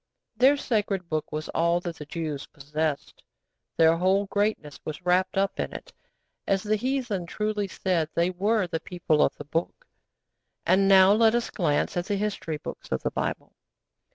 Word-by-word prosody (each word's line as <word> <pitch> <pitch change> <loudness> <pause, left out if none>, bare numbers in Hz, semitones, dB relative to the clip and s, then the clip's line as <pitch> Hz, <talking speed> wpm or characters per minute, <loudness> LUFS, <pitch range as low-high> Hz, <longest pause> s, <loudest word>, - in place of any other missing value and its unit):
Their 270 +3 +5
Sacred 205 -8 -1
Book 155 -1 -2
was 155 0 -4
all 170 +1 +2
that 170 -2 -5
the 150 - -9
Jews 155 -3 -4
possessed. 150 +1 -4 0.6
Their 165 0 +5
whole 190 +3 +2
greatness 200 -7 -1
was 155 +4 -7
wrapped 180 +2 +2
up 195 0 0
in - - -2
it. - - -9 0.5
As 195 -1 +1
the 215 0 +1
heathen 240 -6 -2
truly 210 +2 -2
said, 180 -4 -1
they 170 +2 +2
were 205 +3 +1
'The 165 -2 -3
People 160 -3 0
of - - +2
the 145 - -9
Book.' 165 - -3 0.8
And 195 +1 +4
now 190 0 +7
let 225 +1 +4
us 240 - -1
glance 150 -7 0
at 175 - -2
the 205 - 0
history 200 -6 -2
books - - -9
of - - -1
the - - -1
Bible. - - -3
185 Hz, 175 wpm, -26 LUFS, 160-205 Hz, 0.8 s, now